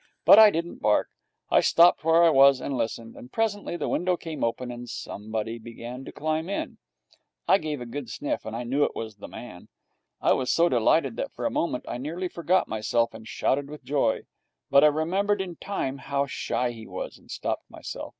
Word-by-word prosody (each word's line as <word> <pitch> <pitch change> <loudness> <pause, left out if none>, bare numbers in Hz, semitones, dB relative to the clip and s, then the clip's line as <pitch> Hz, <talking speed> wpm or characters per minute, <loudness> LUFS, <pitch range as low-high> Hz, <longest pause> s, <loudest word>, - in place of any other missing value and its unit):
But 210 - +9
I 215 -1 +10
didn't 170 -2 -4
bark. 105 - +2 0.4
I - - +6
stopped 170 0 +5
where 165 +1 +5
I 165 - +6
was 135 -1 +6
and 135 - -3
listened. 115 -1 -3
And 125 - -12
presently 205 -5 -1
the - - -3
window 180 0 0
came 160 -2 -6
open, 120 +2 -2
and 120 0 -8
somebody 110 +2 -5
began 120 +3 -8
to - - -8
climb 155 +3 -2
in. 200 - -4 0.7
I 190 - +5
gave 150 -4 -4
a - - -5
good 120 +1 -6
sniff, 145 +6 -3
and 110 - -6
I 120 - -3
knew 135 +5 +1
it - - -1
was 110 -2 -6
the - - -9
man. 90 -8 -10 0.5
I - - +3
was 130 -1 -1
so 170 +1 +4
delighted 130 - +2
that 275 - -3
for - - -5
a 290 - +1
moment 165 - -1
I 120 - -4
nearly 170 +7 -4
forgot 175 +3 +1
myself 110 +2 0
and 110 0 -11
shouted 140 +1 -1
with 150 0 -10
joy, 140 -6 0 0.5
but 140 - +7
I - - +8
remembered 185 +7 +1
in 180 -3 -5
time 140 -9 -3
how 140 +1 -1
shy 125 -2 -2
he 110 -2 -10
was, - - -6
and - - -23
stopped - - -4
myself. - - -7
140 Hz, 210 wpm, -26 LUFS, 120-170 Hz, 0.7 s, I